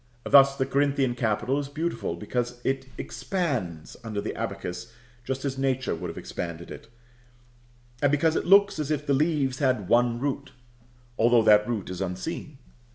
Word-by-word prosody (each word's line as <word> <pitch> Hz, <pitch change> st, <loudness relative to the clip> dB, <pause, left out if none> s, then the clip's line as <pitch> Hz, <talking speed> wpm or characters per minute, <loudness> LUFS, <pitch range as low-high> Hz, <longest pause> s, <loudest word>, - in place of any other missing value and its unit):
Thus 140 Hz, 0 st, +6 dB
the 130 Hz, -, +1 dB
Corinthian 140 Hz, -2 st, +1 dB
capital 120 Hz, +3 st, 0 dB
is 140 Hz, -1 st, -5 dB
beautiful, 155 Hz, -, -3 dB
because 120 Hz, +6 st, -3 dB
it 135 Hz, 0 st, -1 dB
expands 125 Hz, -, -3 dB
under 110 Hz, -3 st, -4 dB
the -, -, -3 dB
abacus 100 Hz, +6 st, -5 dB, 0.3 s
just 130 Hz, +2 st, -4 dB
as 135 Hz, -1 st, -2 dB
Nature 130 Hz, -1 st, 0 dB
would -, -, -5 dB
have -, -, -8 dB
expanded 85 Hz, -1 st, -6 dB
it; -, -, -10 dB, 1.1 s
and 145 Hz, -, +3 dB
because 155 Hz, +2 st, +2 dB
it -, -, -1 dB
looks 200 Hz, -2 st, +5 dB
as 150 Hz, -2 st, -2 dB
if 150 Hz, -1 st, -1 dB
the 140 Hz, -, +2 dB
leaves 140 Hz, -3 st, +1 dB
had 130 Hz, -9 st, +1 dB
one 120 Hz, +1 st, +3 dB
root, 140 Hz, 0 st, -3 dB, 0.7 s
though 120 Hz, 0 st, +5 dB
that 105 Hz, -1 st, +5 dB
root 110 Hz, -6 st, -3 dB
is 90 Hz, 0 st, -5 dB
unseen. 95 Hz, -, -5 dB
130 Hz, 160 wpm, -26 LUFS, 115-145 Hz, 1.1 s, Thus